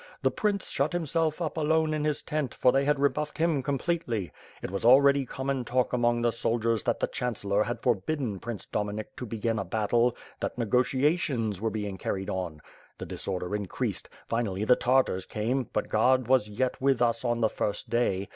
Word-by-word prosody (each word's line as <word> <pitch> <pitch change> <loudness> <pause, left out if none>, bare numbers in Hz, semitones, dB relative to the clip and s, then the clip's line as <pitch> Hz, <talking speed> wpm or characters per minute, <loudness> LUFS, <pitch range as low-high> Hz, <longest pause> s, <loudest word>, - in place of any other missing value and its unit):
The - - +3
prince 205 -2 -1
shut 145 +4 0
himself 165 -1 0
up 155 0 -3
alone 160 0 +2
in 150 -1 -1
his 150 -1 0
tent, 150 -5 -2
for 125 - +4
they 135 +2 +2
had 150 0 +2
rebuffed 150 +2 0
him 160 -4 +2
completely. 135 - -2 0.3
It - - -4
was 100 - -3
already 140 +2 +6
common 135 0 -2
talk 125 +1 0
among 120 -1 +2
the 120 - +3
soldiers 115 -1 0
that - - +1
the - - +2
(.Chan 125 -2 -3
cellor 100 +1 0
had 120 - -4
forbidden 120 -1 0
Prince 115 -1 -6
Dominik 105 +1 -4
to 125 - -5
begin 115 +1 -1
a - - -1
bat 110 -3 -2
tle— 120 0 +3 0.2
that - - -3
negotiations 125 - +1
were 115 - +1
being 105 -3 -4
carried 95 +1 -3
on. 85 -5 -4 0.3
The - - -6
disorder 90 -1 -4
•increased 105 -2 -3
— - - -27
finally 105 -4 -1
the 125 - +6
Tartars 125 -8 +1
came, 120 +4 -1
but 105 - -1
God 125 +3 +3
was 130 -4 +3
yet 125 +6 -2
with 135 -2 +3
us 115 -1 +1
on 120 -1 0
the 110 - +5
first 105 - -3
day. 100 -5 0
120 Hz, 195 wpm, -28 LUFS, 105-140 Hz, 0.3 s, already